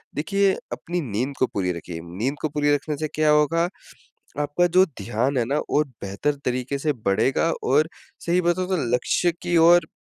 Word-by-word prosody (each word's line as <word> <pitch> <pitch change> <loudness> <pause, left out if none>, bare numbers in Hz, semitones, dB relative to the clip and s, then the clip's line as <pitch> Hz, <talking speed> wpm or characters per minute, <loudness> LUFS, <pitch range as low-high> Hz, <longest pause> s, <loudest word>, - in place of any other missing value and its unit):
देखिए 195 +6 +2 0.2
अपनी 175 +1 -3
नींद 130 +7 -2
को 130 - +3
पूरी 95 -3 -2
रखिए। 85 0 -7
नींद 105 +12 -3
को 155 - -1
पूरी 145 0 +1
रखने 150 0 -4
से 155 - -2
क्या 155 0 +2
होगा? 150 +3 +3 0.7
आपका 145 +4 +1
जो 185 +2 +5 0.2
ध्यान 120 +5 0
है 120 - +1
ना 140 +5 0
वो 150 - +3 0.2
बेहतर 100 +10 -1
तरीके 125 +2 -1
से 150 +1 0
बढ़ेगा। 115 +11 +2
और 150 +4 +3 0.4
सही 175 +2 +2
बताऊ 180 +1 0
तो 190 0 0 0.2
लक्ष्य 175 +7 +1
की 175 -1 +1
ओर 170 +2 +6
150 Hz, 180 wpm, -23 LUFS, 125-170 Hz, 0.7 s, ओर